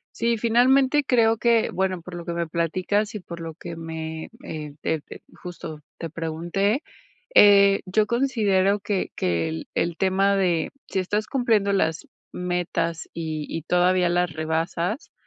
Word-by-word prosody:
Sí, 235 0 +1
finalmente 260 +5 +3
creo 225 -3 +3
que, 235 -1 +3
bueno, 185 -2 -1
por 180 +2 -10
lo 170 -1 -7
que 170 - -3
me 170 0 -1
platicas 185 +6 -1
y 210 - -4
por 170 -2 -9
lo 165 -1 -6
que 170 +1 -8
me, 160 -1 -6 0.2
eh, 150 - -6
te 160 -1 0
te, - - -12 0.2
justo, 165 -3 -7 0.2
te 165 -2 -6
pregunté, 170 - -1 0.5
eh, 200 -1 +7
yo 210 +3 +2
considero 210 -6 +2
que 205 -1 -2
que 85 -2 0
el 80 - -5
el 170 0 0
tema 195 +1 +2
de 175 -4 +1 0.2
si 190 - -1
estás 210 +4 -1
cumpliendo 220 -7 +2
las 165 -4 0 0.2
metas 175 -2 -2
y 155 -2 -4
y 165 - -4
todavía 180 +1 +3
las 175 -1 +1
rebasas, 165 - -2
180 Hz, 155 wpm, -24 LUFS, 165-205 Hz, 0.5 s, eh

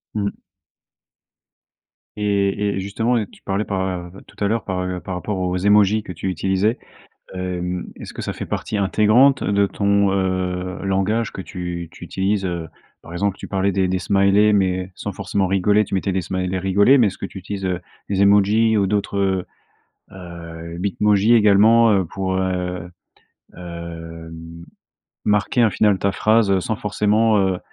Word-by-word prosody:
Mmh. 100 -1 -1 1.9
Et 100 -2 +1
et 100 +1 -1
et - - -2
justement, 110 +4 0
tu - - -20
parlais 100 +2 -1
par, 95 -3 -3 0.2
tout - - -7
à 100 - +3
l'heure 115 +2 -1
par, 95 -2 -2
heu, 90 - -3
par 90 - -8
par 95 - -5
rapport 95 +2 -3
aux 90 0 -1
émojis 105 +2 +3
que 90 - -8
tu 90 +3 -4
utilisais. 95 +5 0 0.6
Hem, 90 -1 -3
est-ce - - -9
que - - -7
ça - - -3
fait - - -6
partie 110 - -3
intégrante 110 +7 +4
de 100 0 +2
ton, 100 0 +1
heu, 95 -1 -2
langage 95 +3 0
que - - -7
tu 90 -2 -6
tu 85 - -11
utilises? 95 +3 -1
Heu, 85 -2 -4 0.3
par 85 - -12
exemple, 100 +2 -1
tu - - -8
parlais 95 0 0
des 95 0 +1
des 95 0 0
smileys, 100 +3 +3
mais 95 -2 +1
sans 100 - -5
forcément 95 +1 -1
rigoler, 100 +3 +2
tu - - -6
mettais 95 0 0
des 95 - 0
smileys, 95 +1 -2
rigolé. 100 +8 +4
Mais 115 - +5
est-ce 100 - -3
que - - -4
tu - - -10
utilises, 95 +1 -6
heu, 90 -1 -1 0.3
les 100 - 0
émojis 105 +3 +4
ou 100 -2 +2
d'autres, 100 -2 -1 0.7
heu, 85 -2 -9
Bitmojis 100 +3 +2
également, 110 +1 +5
heu, 95 -3 +2
pour, 95 +2 -3
heu, 90 -2 -2 0.7
hem, 85 -1 -9 0.6
marquer 105 +4 +1
un 110 - +4
final 100 -1 +2
ta 100 - +1
phrase 110 -3 +3
sans 110 - -2
forcément, 105 +1 +2
heu 95 -2 +1
95 Hz, 170 wpm, -21 LUFS, 90-105 Hz, 1.9 s, Mais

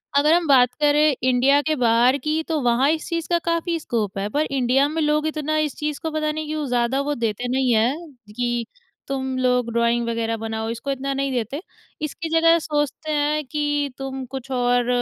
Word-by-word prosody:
अगर 295 +3 +5
हम 345 0 +3
बात 250 -3 +5
करें 295 0 +4
इंडिया 260 +3 +4
के 310 +1 0
बाहर 245 +1 +3
की 310 +1 0
तो 320 -2 0
वहाँ 245 +3 +3
इस 320 -1 -3
चीज़ 335 -1 -2
का 345 -1 +2
काफ़ी 335 0 0
स्कोप 220 -9 -3
है। 195 +1 -1
पर 295 +7 0
इंडिया 270 +1 +2
में 320 +1 -2
लोग 300 0 +1
इतना 310 0 -1
इस 305 -2 -1
चीज़ 300 -1 -3
को 320 - -3
पता 310 0 -1
नहीं 310 0 -4
क्यों 305 -1 -3
ज़्यादा 245 +2 +1
वो 290 +1 -2
देते 230 0 -2
नहीं 255 -1 +1
है 220 +2 +3 0.5
कि 240 -1 -1 0.4
तुम 265 -1 -3
लोग 250 -2 +1
ड्राइंग 235 0 +1
वगैरह 230 0 -1
बनाओ 220 0 -4
इसको 235 +4 -4
इतना 275 +1 -2
नहीं 275 0 -1
देते। 250 +4 -3 0.4
इसकी 315 +2 -4
जगह 330 0 +5
सोचते 305 0 -2
हैं 300 0 +1
कि 290 0 -1
तुम 270 -1 -5
कुछ 265 +1 -8
और 245 -1 +1
275 Hz, 200 wpm, -22 LUFS, 245-305 Hz, 0.5 s, अगर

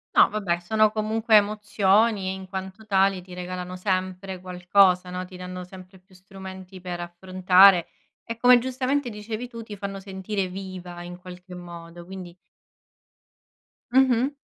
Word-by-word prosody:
No, - - +8
vabbè 190 -5 -1
sono 215 +4 +3
comunque 220 +1 +1
emozioni 210 -1 +3
e - - -2
in 190 0 -8
quanto 190 +2 -7
tali 195 -1 +3
ti 180 0 -12
regalano 180 0 -5
sempre 185 0 -2
qualcosa, 180 0 +3
no, 180 0 -4
ti 185 0 -11
danno 180 0 -7
sempre 185 +1 -13
più 185 0 -24
strumenti 190 0 -11
per 175 -1 -5
affrontare 185 +1 +4 0.4
e, 230 - -5
come 245 +1 +7
giustamente 260 +1 -1
dicevi 215 +3 -6
tu, 230 -2 -9
ti 210 -2 -9
fanno 195 0 -5
sentire 190 0 -3
viva 180 -2 -8
in 175 0 -8
qualche 180 0 -11
modo; 170 -1 -10
quindi 185 -2 -9 1.6
Mh-mh. 260 0 +4
190 Hz, 145 wpm, -25 LUFS, 180-210 Hz, 1.6 s, No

